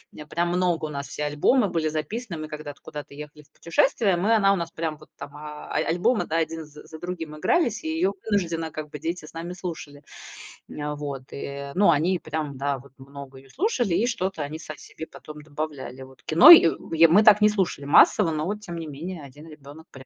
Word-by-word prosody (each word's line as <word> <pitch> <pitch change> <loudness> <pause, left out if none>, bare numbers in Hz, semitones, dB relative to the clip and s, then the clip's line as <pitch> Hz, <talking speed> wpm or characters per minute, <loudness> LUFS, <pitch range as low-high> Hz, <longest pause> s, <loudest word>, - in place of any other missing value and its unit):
э, 150 - -9
прям 170 +3 -1
много, 175 -3 0
у - - -5
нас 140 -1 -5
все 150 - -5
альбомы 175 - +2
были 165 -3 -1
записаны, 170 - -4
мы 155 - -5
когда-то 150 -2 -8
куда-то 150 -1 -9
ехали 150 +1 -10
в 145 - -31
путешествие, 195 - +1
мы 200 +6 +2
она 195 -2 +4
у - - +1
нас 170 -3 -4
прям 160 -2 -4
вот 155 - -18
там, 145 - -10
а, 150 0 -9
а - - -7
альбомы 180 +8 +1
один 165 0 -2
з 150 0 -14
за 160 - -11
другим 170 -4 -6
игрались, 275 - +1
и 320 - -5
ее 330 +4 0 0.2
вынужденно 165 -5 -1
как 155 0 -7
бы 150 - -8
дети 165 +1 -4
с - - -14
нами 170 +2 -6
слушали. 160 -5 -8 0.7
Вот, 145 -2 -5
э, 140 0 -6
но 195 -1 +5
они 170 +4 +1
прям, 155 -3 -5
да, 140 +1 -1
вот 135 +1 -17
много 135 0 -11
ее 135 0 -19
слушали, 250 - 0
и 235 - +2
что-то 190 -8 -2
они 150 +2 -6
сами 155 -2 -9
себе 160 - -10
потом 150 0 -12
добавляли. 145 -4 -6
Вот 130 -2 -17
"Кино" 250 - +8
й 335 - +10 0.3
й 165 +1 +7
мы 195 +7 +5
так 210 -1 +7
не 210 - +6
слушали 190 -8 -1
массово, 165 +4 +5
но 155 +6 -2
тем 175 -5 -8
не 165 -1 -6
менее 160 +3 -7
один 145 +4 -13
ребенок 150 +1 -13
прям 130 -1 -13
155 Hz, 215 wpm, -25 LUFS, 145-180 Hz, 0.7 s, й